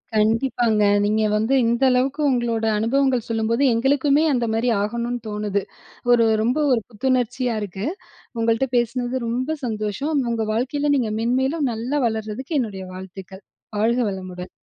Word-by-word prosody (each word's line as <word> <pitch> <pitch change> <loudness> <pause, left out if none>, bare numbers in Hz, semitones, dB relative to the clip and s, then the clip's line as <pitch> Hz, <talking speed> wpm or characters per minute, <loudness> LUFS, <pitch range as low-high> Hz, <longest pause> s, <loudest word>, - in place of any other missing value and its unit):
கண்டிப்பாங்க. 225 0 +2 0.2
நீங்க 215 +1 +1
வந்து 220 +5 +1
இந்த 235 +3 +1
அளவுக்கு 265 +4 +1
உங்களோட 235 -3 0
அனுபவங்கள் 255 +2 +1
சொல்லும்போது, 230 +3 0
எங்களுக்குமே 280 +5 +2
அந்த 240 -2 +1
மாரி 230 +2 +1
ஆகணும்னு 235 +3 -2
தோணுது. 210 -1 -1 0.5
ஒரு, 235 -1 +5 0.2
ரொம்ப 245 +5 +1
ஒரு 240 -3 +3
புத்துணர்ச்சியா 250 +1 0
இருக்கு. 195 0 -5 0.6
உங்கள்ட்ட 230 +3 +1
பேசுனது 245 +1 -1
ரொம்ப 255 +7 -1
சந்தோஷம். 220 +7 -1
உங்க 225 -1 -1
வாழ்க்கையில 285 +5 0
நீங்க 240 -5 0
மேன்மேலும் 265 +5 +1
நல்லா 240 +6 -2
வளர்றதுக்கு 220 +7 -3
என்னுடைய 200 -6 -4
வாழ்த்துக்கள். 190 +1 -10 0.3
வாழ்க 230 +3 +2
வளமுடன். 185 -1 -7
235 Hz, 130 wpm, -22 LUFS, 215-260 Hz, 0.6 s, ஒரு